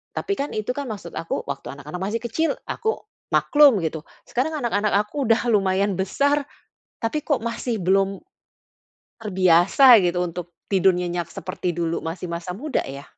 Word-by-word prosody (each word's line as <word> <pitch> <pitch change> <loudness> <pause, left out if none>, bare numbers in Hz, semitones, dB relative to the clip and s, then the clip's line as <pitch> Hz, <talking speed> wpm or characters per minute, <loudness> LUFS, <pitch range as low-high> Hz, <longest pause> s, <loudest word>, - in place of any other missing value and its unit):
Tapi 400 - -1
kan, 285 -5 -3
itu 215 +3 -3
kan, 280 -5 -5
maksud 205 -5 -7
aku 165 - -4
waktu 140 -1 -5
anak-anak 150 +5 -8
masih 215 +4 -2
kecil 320 +8 0 0.2
aku 445 -1 -3 0.2
maklum 290 -7 +5
gitu. 160 -2 -3 0.2
Sekarang 305 +5 -1
anak-anak 215 -5 0 0.2
aku 285 +5 -4
udah 225 0 +4
lumayan 195 -2 +2
besar, 280 +10 +1 0.6
tapi 295 +6 -2
kok 285 -7 +1
masih 235 -2 -3
belum 195 +1 +1 1.0
terbiasa 190 +5 +6
gitu 180 -1 +1
untuk 175 0 -6 0.2
tidur 190 -1 +4
nyenyak 175 -1 -2
seperti 180 -2 -4
dulu 170 -1 -1
masih 170 +1 -5
masa 180 +2 -5
muda 285 +6 -2
ya. 140 +1 -7
195 Hz, 155 wpm, -23 LUFS, 175-245 Hz, 1.0 s, terbiasa